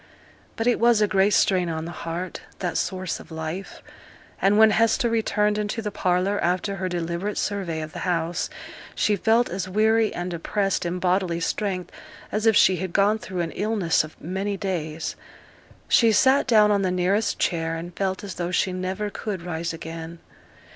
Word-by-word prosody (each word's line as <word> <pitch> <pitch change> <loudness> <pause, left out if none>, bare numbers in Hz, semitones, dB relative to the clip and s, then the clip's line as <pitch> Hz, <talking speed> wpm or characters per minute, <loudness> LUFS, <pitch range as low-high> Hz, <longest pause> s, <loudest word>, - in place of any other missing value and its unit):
But 225 - -2
it 245 -1 +3
was 235 -1 +4
a 210 - +3
great 195 0 +3
strain 180 -3 +3
on 160 0 -3
the 170 - -6
heart, 170 +2 -5 0.2
that 175 -2 -3
source 185 -2 -2
of - - -13
life; 160 +4 -6 0.6
and 200 +2 +4
when 220 0 +7
Hester 230 +2 +2
returned 210 -2 +1
into 210 +2 -2
the 210 -2 -3
parlour, 185 +1 0
after 185 +3 0
her 185 0 -2
deliberate 175 +3 -3
survey 185 -6 -2
of 155 - -8
the - - -6
house, 170 -1 -1 0.5
she 210 - +2
felt 225 +5 +3
as 185 +1 -4
weary 220 +2 +3
and 175 +1 -4
depressed 195 +2 -1
in 175 +1 -2
bodily 180 -1 +1
strength 185 +1 -2 0.4
as 215 +2 0
if 220 - +5
she 185 -2 +5
had 185 0 -4
gone 205 +2 +3
through 185 -4 -4
an 165 -1 -3
illness 205 -8 +1
of 155 - -12
many 195 +4 -3
days. 165 -5 -3 0.7
She 230 -2 +5
sate 260 +7 +4
down 215 -4 +5
on 200 -1 +2
the 190 - +1
nearest 185 +4 +1
chair, 165 -2 0
and 170 +1 -7
felt 190 0 -2
as 200 -3 -5
though 175 0 -3
she 185 0 0
never 185 +3 -3
could 195 -5 -5
rise 170 -1 -3
again. 165 0 -7
185 Hz, 180 wpm, -24 LUFS, 170-210 Hz, 0.7 s, when